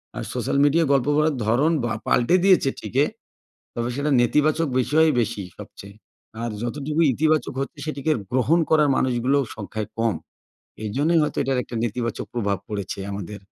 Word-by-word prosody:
আর - - -4
social - - -1
মিডিয়ায় 155 +2 +3
গল্প 135 -1 +2
করার 155 -1 +2
ধরন 130 +9 +2
বা 120 - -1 0.2
পাল্টে 125 +9 +3
দিয়েছে 185 -8 +5
ঠিকই, 125 +6 0 0.7
তবে 120 0 -2
সেটা 145 +2 -1
নেতিবাচক 150 +6 +2
বিষয় 155 +5 +3
বেশি 115 -3 -2
সবচেয়ে। 100 +1 -11 0.5
আর, 120 - -2
যতটুকু 145 +6 -2
ইতিবাচক 155 +1 +1
হচ্ছে 140 - -6
সেটিকে 155 0 -2 0.2
গ্রহণ 130 +7 +3
করার 150 -2 +4
মানুষগুলোও 130 +2 +1
সংখ্যায় 105 0 -5
কম। 115 -4 +1 0.7
এইজন্যই 145 +10 +1
হয়তো 150 - -2
এটার 135 -1 0
একটা 120 - -10
নেতিবাচক 115 0 -3
প্রভাব 100 -4 -1
পড়েছে 100 -2 -4
আমাদের। 100 +1 -6
130 Hz, 150 wpm, -23 LUFS, 115-150 Hz, 0.7 s, দিয়েছে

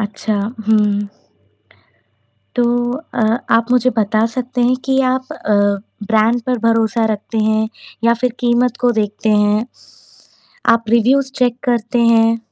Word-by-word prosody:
अच्छा, 210 +1 -3 0.3
हुँ। 205 -2 +2 1.5
तो 245 - +3 0.5
अ, 225 - +1 0.3
आप 230 0 +3
मुझे 250 0 +3
बता 215 +1 +1
सकते 250 0 -3
हैं 245 +1 +3
कि 265 0 +1
आप 260 0 -4
अ, 210 - -2 0.5
ब्रांड 225 +2 +2
पर 250 -1 0
भरोसा 225 0 +1
रखते 215 +2 -5
हैं 220 0 +1 0.4
या 235 0 +4
फिर 250 +1 -1
कीमत 240 0 +1
को 245 - +3
देखते 210 +1 -3
हैं? 210 +1 +2 1.1
आप 230 0 +1
रिव्यूज़ 260 +4 +2
चेक 245 -1 +1
करते 240 -1 0
हैं? 230 0 +3
230 Hz, 135 wpm, -17 LUFS, 215-245 Hz, 1.5 s, या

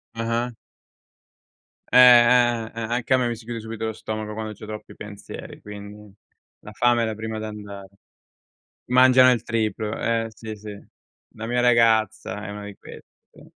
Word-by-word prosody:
Ah-ah. 115 +1 -2 1.4
Eh, - - +5 0.7
eh, 110 - -11
eh, 115 - -6
anche 120 +3 -1
a - - +5
me 125 -1 0
mi 120 - -2
si 110 0 -14
chiude 115 -1 -5
subito 110 0 -6
lo 110 - -3
stomaco 110 0 -5
quando 110 0 -5
c'ho 105 - -11
troppi 105 0 -9
pensieri, 105 -1 -10
quindi 105 0 -11 0.5
la - - -12
fame 120 -1 +2
è - - +1
la 110 - -2
prima 110 +1 -5
ad 110 - -5
andare 105 -2 -8 1.0
Mangiano 130 0 +6
il 120 -2 -1
triplo, 110 -2 -2
eh, 115 -1 0
sì, 110 0 -9
sì. 105 -1 -9 0.6
La 110 0 -6
mia 120 +1 0
ragazza 110 -4 +2
è - - -7
una 105 0 -7
di 100 -1 -9
queste, - - -13 0.3
sì. - - -17
110 Hz, 175 wpm, -23 LUFS, 105-115 Hz, 1.4 s, Mangiano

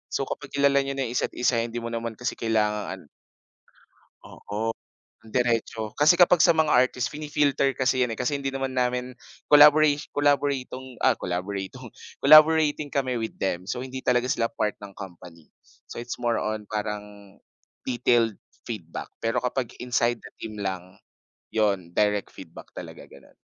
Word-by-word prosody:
So, - - 0
kapag - - -6
kilala 140 0 +4
niyo 135 0 -4
na 135 - -1
‘yong 115 - -6
isa’t - - -1
isa, 125 -1 +1
hindi 115 0 -4
mo 115 - -4
naman 115 -1 -4
kasi 125 +3 -4
kailangan 105 -2 0
an - - -19 1.2
Oo, 105 +3 -5 0.6
diretso. 115 -2 -1
Kasi 150 +3 +6
kapag 175 -1 +5
sa 170 - +6
mga 160 -1 +2
artist, 125 0 +2
fini-filter 145 -2 0
kasi 130 0 +1
‘yan, 120 - -3
eh, - - -7
kasi 145 +3 0
hindi 135 -1 -3
namin 125 -2 -2 0.3
collabora 150 +1 +8 0.2
collaboratong, 140 -3 -1
ah, 130 -3 +3
collaboratong, 95 +2 -5 0.3
collaborating 155 0 +6
kami 130 -3 0
with 115 -1 -3
them. 90 -2 -1
So, 115 +5 -4
hindi 130 0 -7
talaga 125 0 +2
sila 115 -2 0
part 105 -1 -1
ng 100 - -10
company. 85 -4 -11 0.4
So, - - -10
it's 120 +1 -6
more 120 -1 +1
on 110 -1 -3
parang 105 -1 -6 0.5
detailed 120 -4 +2 0.3
feedback. 90 -8 -6 0.2
Pero 115 - +1
kapag 125 -1 -2
inside 120 -1 0
the - - -13
team 110 -2 -8
lang 95 -1 -5 0.5
‘yon, 100 -6 0
direct 105 +1 0
feedback - - -12
talaga, - - -9
gano’n. 70 - -18
120 Hz, 155 wpm, -25 LUFS, 105-135 Hz, 1.2 s, collabora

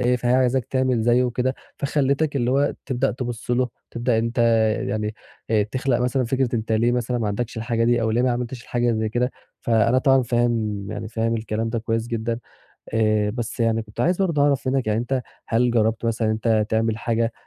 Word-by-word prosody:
إيه، 125 0 +2
فهي 125 +1 +1
عايزاك 130 -1 +2
تعمل 130 -3 0
زيّه 120 +2 +3
وكده، 125 +2 0 0.2
فخلّتك 140 +1 0
اللي 120 -1 +1
هو 140 +2 +2
تبدأ 135 0 0
تبُص 120 -1 -5
له، 125 +1 +2 0.2
تبدأ 120 -1 0
أنت 115 +3 -2 0.5
يعني 105 +1 -2 0.4
آآ 110 -2 +4
تخلق 125 +3 -1
مثلًا 125 +1 +1
فكرة 130 0 0
أنت 110 0 -2
ليه 115 +2 +3
مثلًا 125 0 -1
ما 110 - -1
عندكش 110 +3 -3
الحاجة 115 0 0
دي 120 0 +2
أو 110 - +1
ليه 120 +3 +2
ما 130 - +2
عملتش 120 0 -3
الحاجة 120 -1 0
زي 110 0 0
كده. 125 +3 0 0.3
فأنا 115 +2 +3
طبعًا 135 -1 +4
فاهم 115 -4 0
يعني 110 0 -5
فاهم 115 0 -1
الكلام 110 +1 -2
ده 115 0 -1
كويس 115 +1 -2
جدًا، 115 -1 -2 0.6
آآ 110 -2 +2
بس 120 +1 -5
يعني 115 0 +2
كنت 110 +1 -9
عايز 175 +8 +2
برضه 160 -6 +1
أعرف 140 -2 +2
منّك 130 -3 0
يعني 110 +1 +1
أنت 125 +1 -1 0.3
هل 120 +2 +2
جرّبت 110 0 +1
مثلًا 115 -1 0
إن - - +2
أنت 110 -1 +1
تعمل 110 0 0
حاجة 115 0 0
120 Hz, 205 wpm, -23 LUFS, 110-125 Hz, 0.6 s, آآ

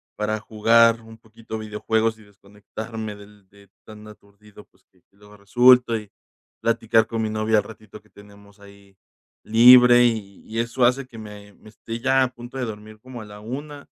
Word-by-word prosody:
para 105 0 -3
jugar 115 +1 +3
un 110 0 -15
poquito 110 0 -10
videojuegos, 110 +1 -2
y 110 - -18
desconectarme 105 +2 -10
del 100 -1 -18
de 100 -1 -22 0.2
tan 105 0 -13
aturdido, 105 0 -18
pues, - - -35
que 90 -2 -32
luego 105 +1 -19
resulta. 120 +3 +4
Y 105 -2 -11 0.5
platicar 115 -1 +1
con 115 0 -4
mi 110 - -2
novia 110 0 0
el - - -3
ratito 110 -1 -14
que 105 - -29
tenemos 100 0 -19
ahí 100 -1 -19 0.5
libre, 120 +2 +7
y 105 -4 -3
y 110 - -7
eso 120 +2 -2
hace 125 +2 +2
que 115 -3 -14
me 105 -1 -12
me 110 - -18
esté 115 +2 -8
ya 135 +1 +2
a - - 0
punto 120 +2 -11
de 125 - -3
dormir 110 0 -10
como 125 -1 -11
a - - -10
la 105 0 -13
1, 140 +6 -8
110 Hz, 185 wpm, -22 LUFS, 105-115 Hz, 0.5 s, libre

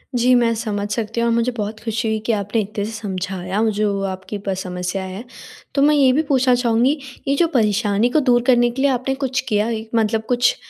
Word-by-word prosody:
जी, 245 +1 +3
मैं 235 -1 +3
समझ 210 -3 -3
सकती 225 +1 -2
हूँ 235 - +2
और - - +2
मुझे 235 +2 +1
बहुत 215 0 -4
खुशी 225 0 -2
हुई 220 0 0
कि 235 - +1
आपने 210 +2 -1
इत्ते 205 0 -4
से 215 - -5
समझाया 190 -2 -3 0.2
जो 200 -2 0
आपकी 190 +2 -6
प 195 - +1
समस्या 180 +1 -4
है। 190 +4 -7 0.5
तो 275 - +2
मैं 300 +1 +5
ये 270 -3 +5
भी 295 - +3
पूछना 260 -2 +3
चाहूँगी, 245 +4 +2 0.3
ये 275 - +2
जो 335 +4 +3
परेशानी 215 - +1
को 310 - +2
दूर 250 -4 +3
करने 240 -2 +4
के 260 +3 -4
लिए 280 0 +3
आपने 260 +1 -1
कुछ 265 -1 -1
किया 210 -1 +2
है 225 -1 -3
मतलब 220 0 +1
कुछ 245 0 +3
225 Hz, 225 wpm, -20 LUFS, 205-250 Hz, 0.5 s, मैं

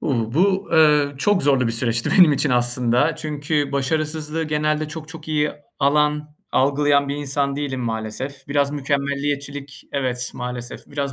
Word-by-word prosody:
Uuu, 115 -4 -1
bu, 195 +4 +2
eee, 150 -3 +4
çok 205 +5 +2
zorlu 135 -3 +3
bir 115 - 0
süreçti 115 0 0
benim 175 -5 +8
için 140 0 +1
aslında 120 +4 +2
çünkü 150 -1 -2
başarısızlığı 155 +3 -1
genelde 155 0 0
çok 155 0 -8
çok 160 -1 -10
iyi 150 -1 +1 0.3
alan, 150 +1 +1 0.2
algılayan 140 +1 +2
bir 140 - -2
insan 140 -1 -1
değilim 140 -3 -3
maalesef. 120 +4 -5
Biraz 140 -1 +1
mükemmeliyetçilik 140 0 -3
Evet, 130 -2 -2
maalesef, 125 -1 -6
biraz 140 -1 -3
140 Hz, 145 wpm, -21 LUFS, 135-150 Hz, 0.3 s, benim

